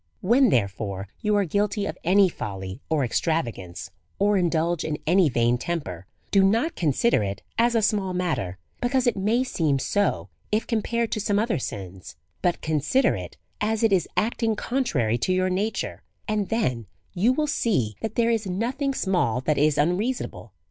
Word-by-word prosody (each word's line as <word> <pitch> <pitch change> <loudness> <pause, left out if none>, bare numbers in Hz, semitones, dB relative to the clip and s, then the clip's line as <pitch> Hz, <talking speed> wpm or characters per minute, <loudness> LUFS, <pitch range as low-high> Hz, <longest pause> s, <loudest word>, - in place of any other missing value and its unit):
When, 240 +6 +4
therefore, 100 - -1
you 210 -1 +1
are 200 -1 +2
guilty 205 +4 0
of - - -4
any 195 +3 +5
folly 95 - -6
or 155 -4 +2
ex 120 - 0
travagance, 115 - -3 0.3
or 205 +1 +3
indulge 170 -2 +1
in 155 -1 -2
any 175 0 +4
vain 120 0 +2
temper, 95 - -4 0.2
do 195 -1 +5
not 230 +12 +2
consider 160 - +2
it 100 -1 -4 0.2
as 235 0 +3
a 225 - +2
small 205 -3 +1
matter, 150 - -2 0.2
because 250 +1 +1
it 240 - +2
may 215 +6 +1
seem 155 - 0
so 205 +9 0 0.2
if 215 +1 +1
compared 235 0 -1
to - - -1
some 205 0 0
other 220 - +1
sins; 95 -7 -7 0.3
but 175 -1 0
consider 155 - +2
it - - -7 0.2
as 220 +1 0
it 220 -3 +4
is 180 -4 +2
acting 225 0 +1
contrary 140 - 0
to 185 - 0
your 185 0 +1
nature, 205 +4 -2 0.3
and 210 -3 -1
then 125 - -1 0.3
you 200 +7 +3
will 300 +4 +1
see 185 - 0
that 220 - -4
there 235 0 +3
is 225 -3 0
nothing 250 +9 -1
small 180 - +1
that 150 +2 0
is 150 0 +3
unreasonable. 175 - -1
185 Hz, 175 wpm, -25 LUFS, 130-220 Hz, 0.3 s, any